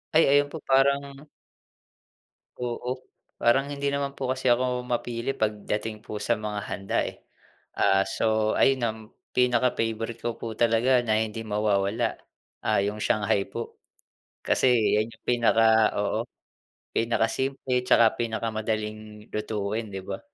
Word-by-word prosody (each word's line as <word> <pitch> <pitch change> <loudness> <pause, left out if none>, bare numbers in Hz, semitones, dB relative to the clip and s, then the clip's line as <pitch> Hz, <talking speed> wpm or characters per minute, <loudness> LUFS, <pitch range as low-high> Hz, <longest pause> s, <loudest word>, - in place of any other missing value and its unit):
Ay, 160 - +7
ayun 145 0 +4
po 160 - -7
parang 140 +2 +1 1.3
Oo, 125 +1 -4 0.3
parang 135 +4 +3
hindi 140 0 -2
naman 140 0 -2
po 130 -1 -2
kasi 130 0 -2
ako 125 +1 +2
mapili 120 +1 -2
pagdating 105 0 -2
po 110 - -8
sa 115 +2 0
mga 105 -1 -3
handa, 95 -1 -2
eh. - - -6 0.6
Ah, 95 0 +3
so 110 +2 +1
ayun 135 -1 +3
ang 110 0 -2 0.4
pinaka-favourite 115 -2 +1
ko 120 -1 -2
po 115 -1 -5
talaga 120 +2 +3
na 110 -1 +2
hindi 110 0 -3
mawawala, 105 +1 0 0.5
ah, - - +2
'yung 105 +2 -2
shanghai 100 -2 +1
po. 115 - -6 0.7
Kasi 130 - +3 0.3
'yan 110 +2 0
'yung 115 - -19
pinaka 115 -2 +4
oo, - - 0 0.7
pinaka 115 0 +1
simple 130 -1 -1
tsaka 115 -2 +5
pinakamadaling 110 -2 -3
lutuin, 105 +1 -3
'di 95 0 -5
ba. - - -5
115 Hz, 135 wpm, -26 LUFS, 110-125 Hz, 1.3 s, Ay